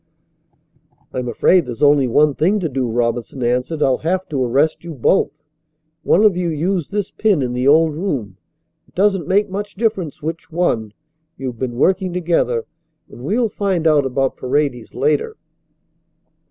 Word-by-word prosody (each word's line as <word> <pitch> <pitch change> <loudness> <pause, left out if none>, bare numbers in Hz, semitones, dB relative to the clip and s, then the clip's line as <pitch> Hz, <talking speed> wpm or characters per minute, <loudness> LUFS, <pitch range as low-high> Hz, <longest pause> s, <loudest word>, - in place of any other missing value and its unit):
"I'm 125 -1 -3
afraid 165 +7 +3
there's 120 +3 -4
only 145 -2 +5
one 145 +5 +3
thing 185 +9 +1
to 170 - 0
do," 130 -4 -2
Robinson 120 +2 -2
answered. 125 +6 0
"I'll 130 -1 +2
have 185 +3 -1
to 140 -4 -1
arrest 140 +8 +1
you 170 -2 -7
both. 135 +9 +2 0.7
One 200 - +3
of 210 -4 +5
you 180 -1 -1
used 170 +1 -1
this 205 -1 -2
pin 200 -10 +1
in 125 -1 -2
the 125 +2 0
old 155 +2 +5
room. 135 - -3 0.5
It - - -29
doesn't 195 -4 +1
make 205 +2 +2
much 205 +1 -5
difference 195 -8 -2
which 160 +1 -5
one. 120 -11 -1 0.4
You've 125 -4 -6
been 125 -2 -3
working 185 +6 +1
together, 165 -10 0 0.5
and - - -12
we'll 225 - +1
find 190 -5 -1
out 150 -4 +4
about 135 +1 -1
Paredes 130 -3 -2
later." 145 +1 0
150 Hz, 160 wpm, -19 LUFS, 125-180 Hz, 0.7 s, only